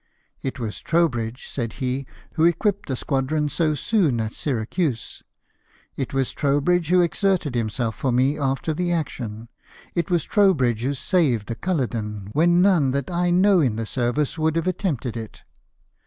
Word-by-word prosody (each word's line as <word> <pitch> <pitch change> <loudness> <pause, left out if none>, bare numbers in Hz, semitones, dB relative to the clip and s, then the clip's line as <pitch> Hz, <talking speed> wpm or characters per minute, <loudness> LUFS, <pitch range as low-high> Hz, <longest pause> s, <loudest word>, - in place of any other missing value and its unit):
" - - -43
It 140 - -14
was 110 -3 -4
Trowbridge," 130 -8 0
said 115 -4 -4
he, 130 0 -3
" - - -27
who 160 - +1
equipped 185 +4 +2
the 130 - -1
squadron 145 +3 -1
so 155 0 +1
soon 160 - +1
at 110 -1 -2
Syracuse; 130 +1 -2 0.7
it 135 - -3
was 135 -1 0
Trowbridge 150 +4 +1
who 180 0 +5
exerted 175 -4 +1
himself 115 0 -1
for 130 - 0
me 130 +4 +2
after 135 +2 -1
the 175 +2 -1
action; 120 -9 -3 0.5
it 170 -2 -1
was 175 -3 +2
Trowl;)ridge 135 - +3
who 135 +3 -1
saved 130 - +1
the 115 - -2
Culloden 115 - -3
when 175 +3 +4
none 175 -9 +4
that 140 +4 -2
I 175 0 +1
know 185 +2 +4
in 130 -9 +2
the 115 0 -3
service 130 +7 -1
would 160 0 +1
have 165 - 0
attempted 155 - -2
it." 110 -2 -8
140 Hz, 170 wpm, -23 LUFS, 120-170 Hz, 0.7 s, who